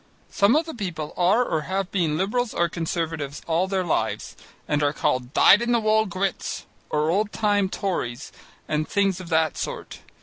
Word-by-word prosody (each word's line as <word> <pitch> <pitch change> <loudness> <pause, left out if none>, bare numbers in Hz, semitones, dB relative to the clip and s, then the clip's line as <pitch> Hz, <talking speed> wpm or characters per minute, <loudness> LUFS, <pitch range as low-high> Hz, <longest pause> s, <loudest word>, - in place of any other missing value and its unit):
Some 200 +6 +4
of 320 +2 +2
the 320 - -6
people 175 -8 -5
are 190 +7 +3
or 160 - -1
have 190 -1 -1
been 165 -6 +1
Liberals 225 +6 -1
or 170 - +2
Conservatives 165 -4 -3
all 170 +3 +1
their 190 -1 0
lives 170 - -2 0.3
and 150 -1 +1
are 145 0 +2
called 130 -3 -1
dyed 205 +8 +6
in 240 0 +1
the 235 - +4
wool 220 0 +2
Grits 190 +1 -3 0.2
or 150 +1 +1
old 205 +3 +1
time 205 -3 +1
Tories 155 -11 -3 0.4
and 155 0 -1
things 195 -2 +1
of 180 -2 -9
that 160 -2 +1
sort. - - -5
185 Hz, 180 wpm, -24 LUFS, 160-205 Hz, 0.4 s, dyed